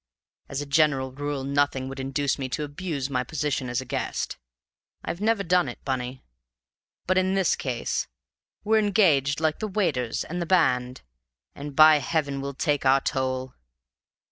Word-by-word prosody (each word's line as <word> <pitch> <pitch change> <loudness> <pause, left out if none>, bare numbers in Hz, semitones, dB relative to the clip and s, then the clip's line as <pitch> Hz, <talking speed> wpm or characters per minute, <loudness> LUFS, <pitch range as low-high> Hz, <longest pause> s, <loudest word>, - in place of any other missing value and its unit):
As 140 +1 -3
a - - -4
general 140 -2 +2
rule 145 0 -4
nothing 140 -1 0
would 135 +1 -7
induce 135 +1 -1
me 130 -1 -3
to 150 +4 -2
abuse 145 -2 -4
my 125 -2 -1
position 140 -2 -2
as 120 +1 -1
a - - -9
guest. 135 +1 -3 0.7
I've 170 - -4
never 220 -1 +2
done 180 -5 +2
it, 120 - -10
Bunny. 130 -1 -3 0.8
But 185 +1 +3
in 190 +1 +1
this 190 -3 +2
case 125 -4 -2 0.6
we're 220 +1 +3
engaged 170 -10 +3
like 160 -1 0
the 215 - -2
waiters 150 - -1
and 175 +2 -5
the 170 - -3
band, 125 -9 +2 0.5
and 145 0 -8
by 155 0 +8
heaven 140 -2 -1
we'll 140 0 -5
take 145 +1 0
our 135 0 +4
toll! 130 -1 -2
140 Hz, 165 wpm, -26 LUFS, 130-165 Hz, 0.8 s, by